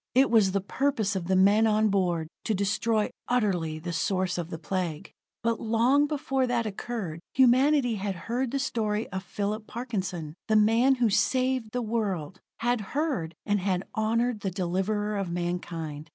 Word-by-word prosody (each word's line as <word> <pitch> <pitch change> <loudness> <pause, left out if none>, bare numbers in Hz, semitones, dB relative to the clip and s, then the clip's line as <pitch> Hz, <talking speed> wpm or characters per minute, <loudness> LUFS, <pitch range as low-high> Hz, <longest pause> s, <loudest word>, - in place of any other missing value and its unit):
It 265 0 +5
was 215 -5 +5
the 200 - +1
purpose 220 -2 0
of 175 -3 -3
the 190 - +2
men 205 +4 +5
on 215 0 +3
board 175 -5 0 0.2
to 220 - +1
destroy 210 +2 0 0.2
utterly 185 -10 0
the 170 +2 -5
source 185 +1 0
of 170 -1 -4
the 165 - -5
Plague. 170 +1 -4 0.3
But 230 -1 +1
long 240 +6 +3
before 270 -3 0
that 240 -2 0
occurred, 205 -5 -4 0.2
humanity 260 -1 +4
had 195 -1 -3
heard 245 +2 -1
the 275 - -1
story 220 -5 -1
of 190 0 -4
Phillip 210 +2 -3
Parkinson, 190 -10 -4
the 220 - +2
man 225 +5 +5
who 240 -4 +2
saved 255 +1 +1
the 245 +1 -2
world 195 -6 -2 0.2
had 240 -1 +1
heard, 210 - -2
and 205 0 +1
had 185 -1 0
honored 230 +1 0
the 200 - -2
deliverer 195 +3 -1
of 195 -3 -2
mankind. 170 -3 -4
210 Hz, 165 wpm, -27 LUFS, 185-240 Hz, 0.3 s, It